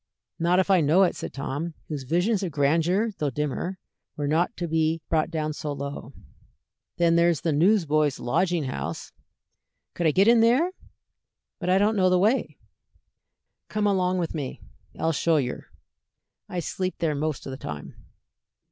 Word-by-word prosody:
"Not 170 +2 +2
if 190 +1 +2
I 185 -3 +5
know 160 +6 +4
it," 180 - +1
said - - -6
Tom, 145 +4 -4
whose 145 -4 -5
visions 180 - +1
of 185 -4 -3
grandeur, 165 +9 +2
though 150 - 0
dimmer, 150 +7 -3 0.4
were 145 -1 -2
not 165 +9 +1
to 175 - -3
be 160 0 +1
brought 160 -1 +1
down 155 -2 -2
so 150 0 -5
low. 140 0 -6 0.9
"Then 170 -1 +3
there's 170 -3 +3
the 165 - 0
Newsboys' 155 -4 +2
Lodging 175 +6 0
House." 85 - -5 0.8
"Could 170 - 0
I - - +4
get 195 +6 +3
in 235 0 +6
there? 250 +11 +4 0.9
But 180 -3 -3
I 185 - +5
don't 210 +3 +2
know 185 -2 +3
the 180 - +4
way." 200 - +1 1.1
"Come 210 -1 -1
along 185 -2 +2
with 170 -3 -2
me; 145 -5 -5 0.4
I'll 165 - +1
show 160 +2 +2
yer. 130 -4 -3 0.8
I 180 - -3
sleep 185 +2 -3
there 160 -3 0
most 150 0 -3
o' 135 - -5
the - - -5
time." 75 - -7
165 Hz, 165 wpm, -25 LUFS, 150-185 Hz, 1.1 s, in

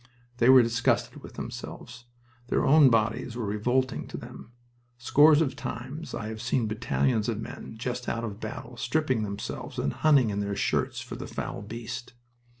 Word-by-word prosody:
They 120 +1 +4
were 130 -1 +9
disgusted 115 +1 0
with - - -11
themselves. 120 0 -8 0.4
Their - - +1
own 145 -1 +7
bodies 115 +1 +1
were 120 -2 -3
revolting 120 +6 0
to - - -7
them. 115 - -10 0.5
Scores 145 +6 +5
of 135 - -3
times 135 +7 -6
I 110 -1 -4
have 110 -1 -6
seen 115 -1 0
battalions 110 +1 0
of 110 -2 -2
men 110 - -8
just 125 +2 -3
out 115 - -2
of 105 -2 -5
battle 115 +2 -7
stripping 130 -1 0
themselves 100 -1 -5
and 70 - -1
hunting 140 -8 +4
in 100 - -2
their 100 0 -2
shirts - - 0
for - - -7
the - - -6
foul - - -5
beast. 120 +4 -7
120 Hz, 170 wpm, -28 LUFS, 110-130 Hz, 0.5 s, were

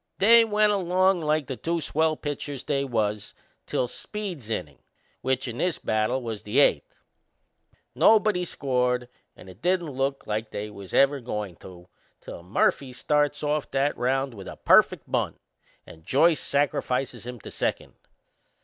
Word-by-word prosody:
They 230 +4 +7
went 210 -1 +2
along 185 -1 +2
like 155 -1 0
the 130 - -5
two 165 +8 -2
swell 160 0 +1
pitchers 145 -2 -5
they 140 -2 0
was 105 -5 -2 0.3
till 125 - 0
Speed's 180 - -6
innin', 85 -10 -4 0.4
which 130 0 -1
in 120 0 -6
this 180 -2 0
battle 110 +4 -1
was 110 -3 -5
the 105 +5 -3
eighth. - - +2 1.0
Nobody 215 -4 +4
scored, 125 -6 -1 0.3
and - - -14
it 95 +3 -14
didn't 175 -3 0
look 135 +1 -2
like 110 +1 -3
they 105 0 -5
was 100 -2 -8
ever 140 +1 +4
goin' 105 -7 -5
to 90 -1 -13 0.3
till - - -9
Murphy 125 +8 0
starts 145 +3 0
off 150 0 -1
that 140 +2 0
round 135 +1 0
with 100 -4 -10
a - - -8
perfect - - +4
bunt - - -2 0.5
and 80 - -14
Joyce 150 - +3
sacrifices 130 -4 -1
him 125 -1 -7
to - - -10
second. - - -3
135 Hz, 155 wpm, -26 LUFS, 115-160 Hz, 1.0 s, They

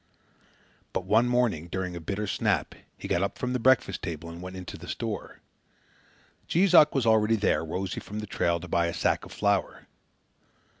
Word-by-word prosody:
But - - -2
one 115 +3 +4
morning, 120 -10 +1
during 90 0 -4
a - - -5
bitter 100 +6 -3
snap, 100 - 0 0.2
he - - -7
got 85 - +1
up 100 - -2
from 125 0 -2
the 125 - 0
breakfast 130 +1 +3
table 85 -1 -5
and 85 +1 -9
went 90 +1 -7
into 90 -1 -7
the 85 - -10
store. 110 -1 -5 1.1
Jees 185 +2 +2
Uck 150 - +7
was 135 -4 +1
already 110 0 +4
there, 105 -5 +1
rosy 90 +4 -3
from 105 - -8
the 105 - -4
trail, 85 -4 0
to 90 - -9
buy 85 0 +1
a 85 - -3
sack 85 - 0
of - - -13
flour. 100 -2 0
100 Hz, 190 wpm, -27 LUFS, 85-115 Hz, 1.1 s, Uck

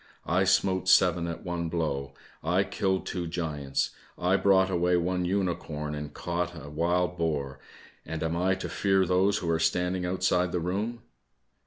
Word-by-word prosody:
I 90 +3 +2
smote 95 0 +2
seven 90 -2 +4
at 85 - -6
one 85 -2 -2
blow. 70 -5 -2 0.3
I - - +2
killed 95 -1 -1
two 90 -2 -3
giants, 75 -5 -2 0.3
I 90 +2 +2
brought 95 -1 +4
away 90 0 +2
one 90 +1 0
unicorn 85 -5 -2
and 75 0 -5
caught 85 +2 -3
a 75 -1 -10
wild 90 +3 0
boar, 70 -5 -1 0.4
and 80 -1 -4
am 80 +1 -1
I 95 +2 +2
to 95 - -5
fear 95 -1 +2
those 95 +3 +2
who 85 - -3
are 80 - +1
standing 90 +2 +1
outside 90 0 +1
the 90 - +1
room." 105 +7 -3
90 Hz, 165 wpm, -28 LUFS, 80-95 Hz, 0.4 s, seven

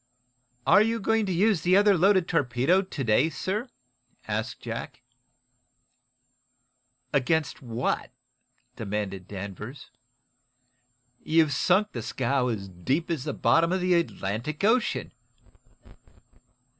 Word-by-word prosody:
"Are 200 - +6
you 225 +1 +1
going 225 0 +1
to - - -1
use 190 0 +2
the 180 +3 +4
other 205 0 +5
loaded 185 0 +3
torpedo 145 +4 +2
to 185 -7 -5
day, 125 +7 +3
sir?" 210 - -3 0.6
asked - - -3
Jack. - - -7 2.1
"Against 150 +2 0
what?" 120 -2 -2 0.7
demanded 100 -2 -4
Danvers. 100 +7 -8 1.3
"You've 160 -2 +2
sunk 190 +7 +2
the 120 - -5
scow 125 +3 -1
as 105 -5 -3
deep 130 - -2
as 150 -6 -2
the 150 - -2
bottom 165 +1 +3
of 185 - +1
the 180 0 +2
Atlantic 150 - -2
Ocean." 230 +4 +1
160 Hz, 110 wpm, -26 LUFS, 120-190 Hz, 2.1 s, Are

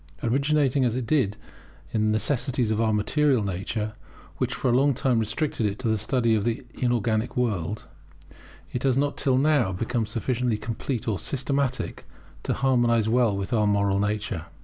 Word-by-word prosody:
Originating 140 +2 +2
as 120 -2 +1
it 125 -2 -2
did 110 -6 +1 0.5
in 110 -1 +1
the - - +2
necessities 120 +1 0
of 110 +1 +1
our 110 -1 +2
material 130 +3 +2
nature, 100 +3 -3 0.4
which - - -1
for - - -2
a - - +3
long 140 +1 +3
time 125 -2 +1
restricted 115 +1 -1
it 100 0 -3
to 130 - -3
the 110 - +2
study 115 +2 +1
of 105 -2 +1
the 120 +2 -2
inorganic 120 -2 0
world, 105 -5 -1 0.9
it 125 - -2
has 135 -2 +2
not 145 +1 +1
till 135 -3 +1
now 140 -7 +3
become 115 +4 -2
sufficiently 120 -1 -1
complete 115 +2 -4
or 105 -4 0
systematic 140 -1 -2 0.4
to - - -2
harmonize 120 -4 +2
well 115 -3 +2
with 100 +5 -3
our 105 -2 +3
moral 100 -1 +2
nature. 100 -4 -2
115 Hz, 170 wpm, -25 LUFS, 105-130 Hz, 0.9 s, a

